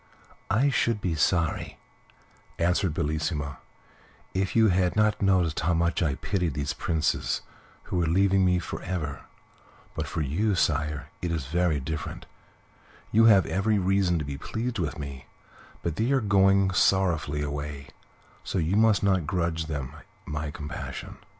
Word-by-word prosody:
"I 125 +6 +3
should 115 -4 +1
be 90 -4 -1
sorry," 80 0 0 0.8
answered 90 +1 +1
Bellissima, 75 -2 -2 0.7
"if 95 0 -1
you 110 -1 +5
had 90 -1 +2
not 105 0 +2
noticed 90 -5 +2
how 85 0 +1
much 85 +2 +1
I 75 -5 +1
pitied 90 -4 -2
these 70 -1 -2
princes 80 -2 -1 0.4
who - - -4
were 85 -2 +1
leaving 95 +3 +3
me 90 -1 +3
for 90 - -5
ever; 80 -6 -4 0.7
but - - -3
for 80 - -3
you, 95 +9 0
sire, 75 -2 0
it 85 - -2
is 80 -5 -2
very 85 0 +1
different: 75 +4 -5 0.9
you 115 +2 +5
have 100 -4 +6
every 105 +3 +1
reason 95 -2 +2
to 75 - -3
be 70 -1 -5
pleased 115 +6 -3
with 80 -1 -2
me, 70 -3 -7 0.6
but 85 -2 -2
they 115 +4 +1
are 135 - +4
going 100 -2 +4
sorrowfully 85 -7 +2
away, 70 -1 -5 0.5
so - - -3
you 85 +2 +1
must 110 -2 +4
not 95 -6 +2
grudge 85 -1 -1
them 70 -4 -4 0.3
my 75 0 -4
compassion." 75 +1 -7
85 Hz, 150 wpm, -27 LUFS, 75-95 Hz, 0.9 s, have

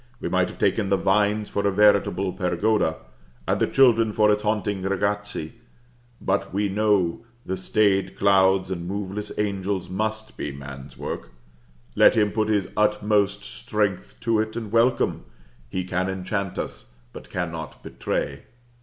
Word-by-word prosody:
We - - -3
might - - +2
have - - -10
taken 95 - +1
the 100 - +3
vines 105 +2 +2
for 100 0 -1
a - - +2
veritable 100 -2 +3
pergoda, 90 -1 +1 0.5
and - - +1
the - - +3
children 115 -5 +4
for 105 0 +4
its 105 0 +1
haunting 105 -2 -1
ragazzi; 100 -3 -2 0.7
but 95 +1 -1
we 100 +1 0
know 100 -2 +1 0.2
the 95 - -2
stayed 95 0 +1
clouds 95 -1 +3
and 85 -2 -4
moveless 100 +1 -4
angels 100 -2 -2
must 110 +2 -3
be 75 - -3
man's 70 0 -10
work; - - -5 0.7
let - - +6
him 105 -2 +3
put 110 -1 0
his 100 -4 +1
utmost 105 -1 +2
strength 105 -5 -2
to 115 -2 +2
it 110 0 -2
and 110 -3 -5
welcome, 115 +2 +2 0.5
he 95 +6 -2
can 90 +1 -1
enchant 95 +1 -3
us, - - -6 0.2
but - - -11
cannot 80 -3 -5
betray. - - -3
100 Hz, 150 wpm, -24 LUFS, 95-105 Hz, 0.7 s, let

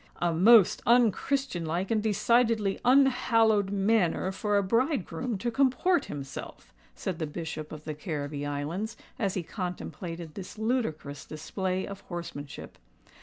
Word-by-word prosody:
"A 175 -1 +1
most 205 +4 +6
un 235 -1 +6
christianlike 185 - -2
and 220 -2 +2
decidedly 220 -1 +2
unhallowed 240 -6 +4
manner 195 -2 +1
for 205 +1 0
a 200 - +2
bridegroom 235 - 0
to 235 +5 -2
comport 275 +7 +2
himself," 140 -2 -8 0.2
said 185 -3 -4
the 160 - -2
Bishop 155 0 -6
of 155 -1 -8
the 155 - -4
Carribbee 150 -2 -4
Islands, 170 +10 -3 0.2
as 200 -5 0
he 185 - -2
contemplated 170 -2 -6
this 195 +1 -8
ludicrous 210 - -2
display 185 +4 -3
of 200 -1 -8
horsemanship. 170 -6 -8
195 Hz, 130 wpm, -28 LUFS, 165-230 Hz, 0.2 s, most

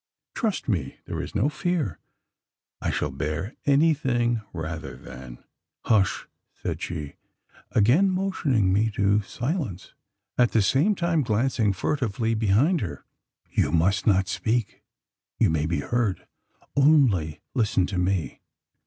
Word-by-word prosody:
Trust 220 -5 -2
me, 85 - -1
there - - -4
is - - -8
no 105 +7 +2
fear. 150 - -2 0.8
I - - -1
shall - - -1
bear 75 - -3
anything, 135 -6 +2
rather 80 -5 -5
than 65 -1 -11 0.2
" - - -40
"Hush!" 105 -4 +2 0.3
said - - -4
she, 75 -4 -5 0.6
again 130 - +4
motioning 155 - +1
me 110 +3 +2
to 100 +1 +3
silence, 120 - -4 0.5
at 120 -1 +4
the 110 - +4
same 150 - +3
time 170 -3 +1
glancing 115 -2 +1
furtively 115 +1 -1
behind 115 - +2
her. 90 - -5 0.5
"You - - +1
must 95 +5 +2
not 95 -2 +4
speak: 105 +5 -1 0.6
you - - +3
may 80 -1 0
be 85 -3 -1
heard! 115 -3 -1 0.5
Only 130 - +3
listen 105 -7 +2
to 90 -1 -3
me. 90 -2 -1
110 Hz, 130 wpm, -25 LUFS, 90-135 Hz, 0.8 s, again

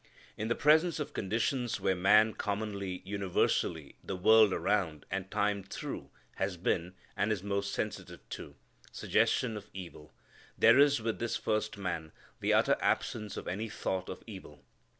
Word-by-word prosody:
In 105 - -3
the 115 - +1
presence 155 +3 +4
of 150 0 -4
conditions 115 +4 -1
where 95 - +2
man 105 +4 +5
commonly, 100 -3 -3
universally, 90 -5 -1
the 95 - -4
world 110 +3 +6
around, 90 -5 0
and 95 0 -3
time 100 0 0
through, 95 - -6 0.3
has 90 - -1
been 90 +1 -1 0.2
and 105 - +1
is 100 -4 -1
most 100 0 -1
sensitive 105 +1 -5
to - - -8 0.4
suggestion 115 -3 +1
of 105 - -8
evil 85 -5 -9 0.5
there - - +6
is 145 -4 +5
with 115 -1 -2
this 120 0 -1
first 110 0 -1
man 85 -5 -4 0.3
the - - 0
utter - - +4
absence 105 -2 -1
of - - -6
any 110 +5 -3
thought 95 -2 -3
of 95 - -7
evil. 95 -9 -11
100 Hz, 155 wpm, -31 LUFS, 95-110 Hz, 0.5 s, world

